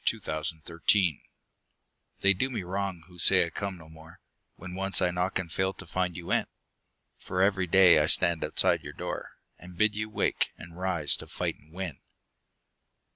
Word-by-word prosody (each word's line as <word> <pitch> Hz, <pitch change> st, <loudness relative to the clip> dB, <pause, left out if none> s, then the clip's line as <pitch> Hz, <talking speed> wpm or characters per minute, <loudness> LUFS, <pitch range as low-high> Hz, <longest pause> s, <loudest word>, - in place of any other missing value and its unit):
OPPORTUNITY 80 Hz, +2 st, -1 dB, 0.9 s
They 100 Hz, 0 st, +5 dB
do 130 Hz, +8 st, -1 dB
me 120 Hz, -7 st, -4 dB
wrong 95 Hz, -1 st, -4 dB
who 90 Hz, -1 st, -16 dB
say 90 Hz, 0 st, +5 dB
I 85 Hz, -, -8 dB
come 100 Hz, +1 st, -5 dB
no 80 Hz, -2 st, -15 dB
more 80 Hz, 0 st, -16 dB, 0.4 s
When 90 Hz, 0 st, -10 dB
once 95 Hz, +1 st, +6 dB
I 90 Hz, -, +1 dB
knock 90 Hz, +2 st, -1 dB
and 90 Hz, -3 st, -5 dB
fail 95 Hz, +2 st, -1 dB
to -, -, -11 dB
find 90 Hz, -1 st, -3 dB
you 85 Hz, -, -7 dB
in; -, -, +1 dB, 0.7 s
For 90 Hz, -, -5 dB
every 95 Hz, -2 st, +1 dB
day 90 Hz, -2 st, +6 dB
I 75 Hz, -, +1 dB
stand 85 Hz, 0 st, +3 dB
outside -, -, +3 dB
your -, -, -9 dB
door, -, -, -6 dB, 0.2 s
And 90 Hz, 0 st, -13 dB
bid 105 Hz, +1 st, +3 dB
you 105 Hz, +1 st, -4 dB
wake, 105 Hz, -, -1 dB
and 85 Hz, 0 st, -12 dB
rise 90 Hz, -5 st, 0 dB
to -, -, -10 dB
fight -, -, -4 dB
and 75 Hz, -, -24 dB
win. 90 Hz, -4 st, -6 dB
90 Hz, 180 wpm, -28 LUFS, 85-95 Hz, 0.9 s, once